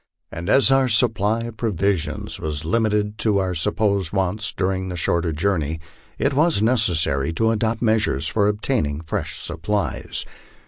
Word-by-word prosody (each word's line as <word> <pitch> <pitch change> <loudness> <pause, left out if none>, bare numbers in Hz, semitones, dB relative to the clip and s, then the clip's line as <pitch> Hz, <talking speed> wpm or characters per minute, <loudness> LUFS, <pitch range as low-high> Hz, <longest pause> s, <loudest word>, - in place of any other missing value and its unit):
And 85 +3 -6
as 135 +3 +5
our 135 -1 +3
supply 110 -1 +1
of 115 -1 -7
provisions 100 -6 -1
was 75 0 -4
limited 105 +2 0
to 105 -3 +2
our 95 -2 0
sup 90 +5 0
posed 100 -5 +1
wants 100 +2 -1
during 95 0 -2
the 90 - -5
shorter 85 0 0
journey, 80 -2 -1 0.4
it 140 - 0
was 155 -1 +3
necessary 85 - +2
to 115 +6 +1
adopt 115 +1 -1
measures 110 - +1
for 105 +1 +1
obtaining 105 - -1
fresh 80 - -3
supplies. 100 +6 -2
100 Hz, 150 wpm, -22 LUFS, 85-110 Hz, 0.4 s, as